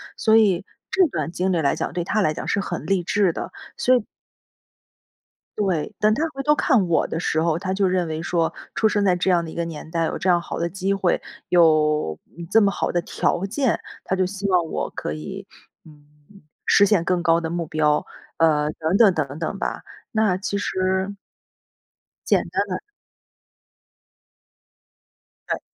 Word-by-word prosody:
所 220 -1 +4
以 195 -4 +3 0.2
这 375 -3 +4
段 160 - -3
经 185 +2 -1
历 170 - +1
来 140 - +2
讲， - - -3
对 175 - -1
她 215 +4 0
来 155 -5 +2
讲 - - -6
是 200 - +1
很 - - -5
励 195 -3 +1
志 185 0 +2
的， - - -5 0.3
所 255 0 +6
以 225 - -2 1.5
对。 185 -7 -1
但 215 0 +4
她 300 - 0
回 275 - -4
头 300 +1 +4
看 230 - +2
我 165 - +2
的 165 - -3
时 160 -2 0
候， 165 -1 +1
她 190 0 -2
就 195 -1 +2
认 180 -2 0
为 160 0 -3
说， 170 -1 0 0.2
出 220 - +3
生 205 -1 +1
在 185 -2 +3
这 180 +2 0
样 175 -2 +3
的 160 - -7
一 - - -11
个 170 0 -1
年 160 -1 -8
代 165 -1 0
有 - - -2
这 185 - -1
样 175 -1 +4
好 - - -5
的 170 0 -1
机 195 +2 -1
会， 190 -3 +1 0.3
有 155 - +3 0.3
这 225 - +6
么 200 -1 +3
好 - - -2
的 175 - 0
条 175 +2 -1
件， 245 +4 0 0.2
她 190 - -1
就 185 -1 +1
希 200 +1 -4
望 180 -2 +3
我 - - -3
可 75 - -4
以， 75 0 -7 0.4
嗯， 150 +5 -20 0.2
实 200 - +5
现 195 -4 +2
更 180 -1 0
高 165 -1 +3
的 160 - -3
目 170 -1 -2
标， 150 -1 +1 0.3
呃， 150 -2 +3
等 165 +5 0
等 210 -6 +6
等 145 -1 -3
等 180 +5 -3
吧。 - - -3 0.3
那 215 -4 +2
其 200 +1 -3
实 190 0 -1 1.1
简 - - +3
单 - - 0
的 - - -3 2.7
嗯。 - - -1
180 Hz, 200 characters per minute, -23 LUFS, 160-200 Hz, 2.7 s, 所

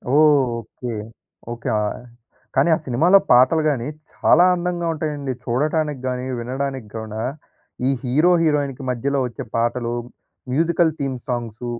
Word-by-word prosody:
Okay. 125 -6 +2 0.6
Okay. 120 0 -4
ఆహ్, 105 +3 -3 0.5
కానీ 135 +5 +4
ఆ - - -2
సినిమాలో 160 +10 +5
పాటలు 130 +6 +5
గాని, 130 -4 -1 0.3
చాలా 175 +3 +5
అందంగా 175 -1 -2
ఉంటాయండి. 150 -3 -3
చూడటానికి 150 +3 0
గాని, 125 0 -2
వినడానికి 130 0 -4
గూడ 110 -1 -6 0.7
ఈ - - +3
హీరో, 150 +8 +3
హీరోయిన్‌కి 145 -3 0
మధ్యలో 135 +3 0
వచ్చే 120 - -6
పాటలు, 120 +1 0 0.6
మ్యూజికల్ 165 +3 +2
థీమ్ 135 -2 -2
సాంగ్స్ 120 -1 -4
135 Hz, 120 wpm, -21 LUFS, 120-155 Hz, 0.7 s, సినిమాలో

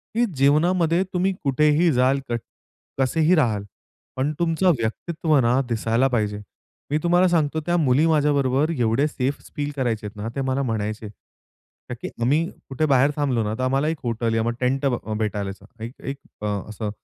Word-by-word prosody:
की 240 - +3
जीवनामध्ये 165 +5 +3
तुम्ही 185 +2 +1
कुठेही 150 +4 +3
जाल, 130 +2 +3
क 120 - 0 0.6
कसेही 160 +6 +3
राहाल 110 -10 +1 0.5
पण 135 +3 0
तुमचं 170 +2 +2
व्यक्तित्व 155 +7 0
ना 120 +2 +3
दिसायला 115 +3 +1
पाहिजे. 105 -3 0 0.5
मी 150 - +3
तुम्हाला 175 +2 +4
सांगतो 160 -3 +1
त्या 175 - +1
मुली 145 -1 +3
माझ्याबरोबर 145 -2 +2
एवढं 120 +3 +2
सेफ 140 -1 -2 0.2
फील 145 0 -2
करायच्यात 110 -6 -2
ना, 105 +2 -4
ते 135 - -1
मला 130 +1 0
म्हणायचे. 110 -2 -3
ताकी 120 +2 -13
आम्ही 150 +7 +2 0.2
कुठे 135 +4 0
बाहेर 140 0 +4
थांबलो 135 -6 0
ना, 105 - -2
तर 130 - -2
आम्हाला 135 +3 +1
एक 160 - -1
हॉटेल 115 -1 -1
या 110 - +1
मग 120 - 0
टेंट 135 +2 +1
ब 125 -3 +2
अ, 110 - -3
भेटालाच. 100 -2 -3 0.2
एक 115 +3 -6
एक 140 +1 -5 0.2
अ, 105 - -3 0.2
असं 105 0 -4
135 Hz, 170 wpm, -23 LUFS, 115-155 Hz, 0.6 s, तुम्हाला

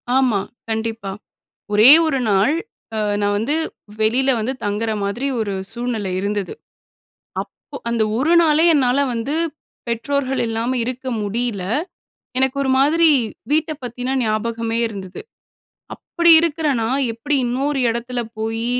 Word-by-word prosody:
ஆமா, 250 -7 +3 0.3
கண்டிப்பா. 220 -2 -3 0.6
ஒரே 215 +5 +8 0.2
1 290 -4 +1
நாள் 205 +10 +3 0.4
அ - - -1 0.2
நான் 205 0 +1
வந்து 230 +9 0 0.5
வெளில 250 +5 +2
வந்து 220 +4 -1
தங்குற 210 +2 -1
மாதிரி 215 +7 -2
ஒரு 210 -2 -2 0.2
சூழ்நிலை 235 -5 -3
இருந்தது. 200 -2 -2 0.9
அப்போ 285 - -13
அந்த 235 -1 +1 0.2
1 310 +7 +2
நாளே 315 0 +4
என்னால 260 -1 +3
வந்து 235 +6 -2 0.5
பெற்றோர்கள் 270 +3 -1
இல்லாம 230 +3 -1
இருக்க 255 +2 -5 0.2
முடில. 220 -1 -2 0.8
எனக்கு 265 +1 +1
ஒரு 265 - -1
மாதிரி 320 +5 +4 0.4
வீட்டப் 310 0 0
பத்தினா 245 +2 -3
ஞாபகமே 225 +1 -1
இருந்தது. 195 -4 -8 0.7
அப்டி 340 -1 +3
இருக்குற 320 -1 -1 0.2
நான் 265 +4 0
எப்டி 280 +6 -1
இன்னொரு 270 +3 -1
இடத்துல 240 +1 -3 0.2
போய் 225 +1 -2
240 Hz, 125 wpm, -20 LUFS, 220-275 Hz, 0.9 s, ஒரே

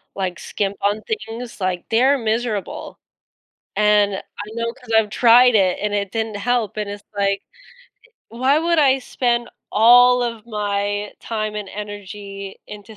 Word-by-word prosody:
like, 185 -2 -3
skimp 200 -1 -3
on 205 +2 0
things, 245 - -6
like, 185 -1 -1
they're 260 +5 +4
miserable 225 -3 -3 0.8
and 210 -1 +3
I 205 +2 -9
know 230 0 -2
'cause 250 -3 -13
I've 215 -2 +3
tried 240 +1 +6
it 185 -3 +3
and 210 0 -1
it 200 -2 -2
didn't 220 -2 -2
help 225 -1 -1
and 210 -1 -3
it's 205 0 -7
like, 200 0 +1 0.9
"Why 260 +6 +2
would 335 0 +1
I 270 -2 +4
spend 240 -1 -1 0.2
all 245 +2 +6
of 230 -2 -4
my 205 -1 -2
time 215 -2 -3
and 205 -2 -5
energy 200 -1 -8
into 210 +1 -11
215 Hz, 150 wpm, -20 LUFS, 205-240 Hz, 0.9 s, tried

